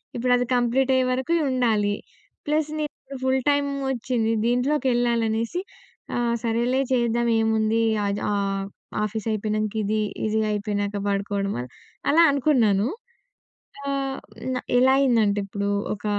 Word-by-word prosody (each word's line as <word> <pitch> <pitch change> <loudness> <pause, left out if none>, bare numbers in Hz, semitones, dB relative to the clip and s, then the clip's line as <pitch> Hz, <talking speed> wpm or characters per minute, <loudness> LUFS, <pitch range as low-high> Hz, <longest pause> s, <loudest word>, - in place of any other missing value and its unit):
ఇప్పుడది 245 0 +2
కంప్లీట్ 250 +2 +2
అయ్యేవరకు 255 +4 +1 0.2
ఉండాలి. 220 -5 +1 0.5
ప్లస్ 305 0 +1
నేను 285 -2 -6
ఫుల్ 260 0 +2
టైమ్ 285 0 +2 0.2
ఒచ్చింది. 235 -2 -1
దీంట్లోకెళ్ళాలనేసి 240 0 +1 0.5
ఆ! - - 0 0.3
సరేలే 240 +3 +1
చేద్దాం 235 -1 +1
ఏముంది, 220 0 +2 0.2
ఆద్ 200 0 -1
ఆహ్, 195 -1 -1 0.4
ఆఫీసయిపోయినంక 215 0 -2
ఇది, 215 +1 0 0.2
ఇది 215 0 +1
అయిపోయినాక 205 0 -2
పడుకోవడం, 200 0 -1 0.6
అలా 330 +3 +6
అనుకున్నాను. 240 -7 +2 1.0
ఆహ్, 275 -1 -2 0.4
న - - -2 0.2
ఎలా 260 +1 +5
అయిందంటే 225 -6 +3
ఇప్పుడు 200 +1 -3 0.3
ఒక 205 - -14
235 Hz, 110 wpm, -24 LUFS, 210-260 Hz, 1.0 s, అలా